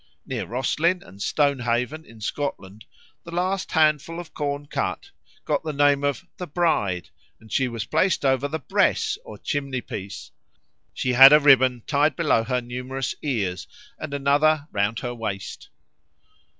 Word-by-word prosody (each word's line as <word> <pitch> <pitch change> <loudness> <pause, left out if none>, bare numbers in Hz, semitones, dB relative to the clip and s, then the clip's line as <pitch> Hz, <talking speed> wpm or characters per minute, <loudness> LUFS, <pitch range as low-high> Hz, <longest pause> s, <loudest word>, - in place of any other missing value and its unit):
Near - - -4
Roslin 155 - 0
and 100 - -14
Stonehaven, 140 +2 0
in 115 -1 -16
Scotland, 105 -5 -5 0.4
the - - -11
last 185 +3 -2
handful 155 +1 +2
of 175 -2 -10
corn 145 -1 -3
cut 395 - -3 0.3
"got 150 -1 0
the 155 - -3
name 145 0 +3
of 145 +5 -1
'the 180 - -6
bride,' 120 - 0 0.3
and 110 - -18
she 135 - +1
was 115 -4 -4
placed 185 - +1
over 135 +1 +2
the 155 +3 -3
bress 140 - +1
or 105 - -10
chimney 140 +1 -3
piece; 100 -3 -8 0.6
she 130 - -1
had 135 +3 +10
a 150 - +8
ribbon 130 -4 +4
tied 145 -1 +2
below 115 - +2
her 125 +2 -1
numerous 125 +2 -4
ears, 100 -11 -2 0.3
and 155 - -6
another 145 +2 +2
round 105 +2 -1
her 120 -1 -4
waist." 105 -5 -6
140 Hz, 150 wpm, -24 LUFS, 120-155 Hz, 0.6 s, had